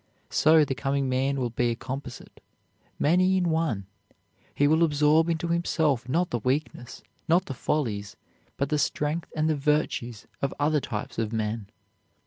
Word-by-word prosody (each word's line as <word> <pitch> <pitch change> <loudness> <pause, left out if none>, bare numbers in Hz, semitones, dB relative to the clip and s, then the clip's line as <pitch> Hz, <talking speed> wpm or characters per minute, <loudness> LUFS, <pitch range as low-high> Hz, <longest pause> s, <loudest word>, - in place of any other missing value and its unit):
So 155 0 +5
the 135 - -2
coming 135 +3 -1
man 135 +2 +1
will 120 -2 -1
be 120 +1 +1
a 115 - -1
composite, 135 +4 -8 0.6
many 185 +5 +3
in 175 -2 +1
one. 160 -12 -1 0.7
He 145 - +3
will 160 +3 +4
absorb 155 +1 +3
into 170 0 -1
himself 155 -7 0
not 175 +5 +1
the 120 - 0
weakness, 125 0 -3 0.2
not 175 +3 +3
the 135 - -5
follies, 110 -8 -2 0.4
but 140 0 -1
the 150 - +1
strength 150 +3 -1
and 155 0 +1
the 155 - +2
virtues 140 -6 -1 0.2
of 140 - -1
other 150 0 +2
types 105 -1 -5
of 110 -1 -1
men. 110 -1 -2
145 Hz, 160 wpm, -26 LUFS, 125-160 Hz, 0.7 s, So